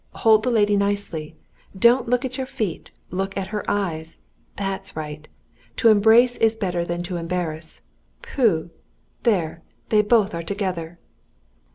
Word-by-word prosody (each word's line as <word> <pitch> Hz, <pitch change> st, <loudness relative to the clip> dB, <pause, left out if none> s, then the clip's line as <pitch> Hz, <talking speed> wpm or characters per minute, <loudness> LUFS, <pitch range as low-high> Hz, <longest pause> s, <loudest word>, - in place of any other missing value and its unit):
Hold 220 Hz, -1 st, +5 dB
the 250 Hz, -, 0 dB
lady 210 Hz, -3 st, +3 dB
nicely! 200 Hz, -6 st, -2 dB, 0.4 s
Don't 235 Hz, +4 st, +4 dB
look 250 Hz, +2 st, +1 dB
at 255 Hz, 0 st, -4 dB
your 260 Hz, -1 st, -3 dB
feet. 215 Hz, -10 st, -4 dB, 0.2 s
Look 195 Hz, +2 st, -3 dB
at 190 Hz, -1 st, -3 dB
her 210 Hz, 0 st, -3 dB
eyes. 165 Hz, -6 st, -2 dB, 0.4 s
That's 195 Hz, -1 st, -4 dB
right! 150 Hz, -1 st, -6 dB, 0.5 s
To 230 Hz, -, +4 dB
embrace 225 Hz, +4 st, +5 dB
is 225 Hz, 0 st, +3 dB
better 180 Hz, -5 st, -1 dB
than 175 Hz, 0 st, -3 dB
to 175 Hz, 0 st, -4 dB
embarrass. 165 Hz, -2 st, -4 dB, 0.4 s
Pooh! 220 Hz, -, +1 dB, 0.5 s
There, 170 Hz, -8 st, 0 dB, 0.3 s
they 215 Hz, -1 st, +5 dB
both 210 Hz, -1 st, +3 dB
are 170 Hz, -, -3 dB
together!" 175 Hz, -3 st, -4 dB
195 Hz, 145 wpm, -23 LUFS, 170-225 Hz, 0.5 s, Hold